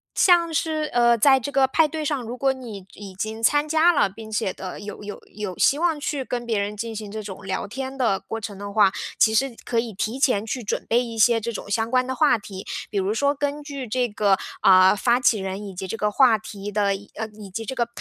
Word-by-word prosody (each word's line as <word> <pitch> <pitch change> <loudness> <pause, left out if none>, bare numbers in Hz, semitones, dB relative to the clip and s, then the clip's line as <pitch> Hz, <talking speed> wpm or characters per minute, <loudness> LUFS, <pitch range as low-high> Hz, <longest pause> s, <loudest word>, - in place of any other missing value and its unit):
像 340 -3 +4
是， 310 -1 -1
呃， 235 -1 +4
在 265 +4 +5
这 275 +3 -5
个 270 -1 +4
派 305 +4 +3
对 310 0 -4
上， 290 -3 -1
如 240 +1 -6
果 270 0 +2
你 225 -7 -9
已 200 -2 -10
经 220 +3 -4
参 290 +6 +3
加 320 +3 +4
了， 295 - +3
并 220 +3 -11
且 210 -3 -1
的， 185 -1 -7
有 205 0 -8
有 205 0 -7
有 205 -4 -5
希 285 - +3
望 330 -3 +1
去 285 -1 -2
跟 245 -1 -4
别 225 -3 0
人 205 +1 -3
进 230 +1 -5
行 210 -1 -6
这 215 +1 -6
种 195 -1 -8
聊 190 0 -3
天 265 +4 -6
的 225 -7 +1
过 225 - -6
程 205 -1 -6
的 200 +1 -7
话， 205 -2 +4 0.3
其 220 - +4
实 260 +2 +1
可 235 - 0
以 230 -1 -3
提 215 +6 -3
前 220 -6 +2
去 245 +3 -3
准 205 - -3
备 240 +2 +2
一 230 -2 -7
些 225 +1 +4
这 235 +2 -3
种 220 - -7
相 225 +3 -1
关 255 +1 +2
的 260 - -3
话 290 -2 +3
题。 195 -2 -9 0.3
比 200 - 0
如 190 +2 0
说 280 +6 +1
根 290 +1 -3
据 280 -4 -6
这 250 +2 0
个， 205 -3 +2 0.2
啊， 185 +1 +6
发 240 +4 +2
起 230 -4 +3
人 190 +2 -5
以 195 - -8
及 185 +1 -6
这 225 - -4
个 210 -1 0
话 235 -1 +5
题 205 -1 -8
的 200 -1 +1
以 205 +1 -11
呃， 220 +1 -4
以 210 -2 -12
及 225 +4 -5
这 240 - -4
个， 235 -2 0
225 Hz, 275 characters per minute, -23 LUFS, 205-265 Hz, 0.3 s, 啊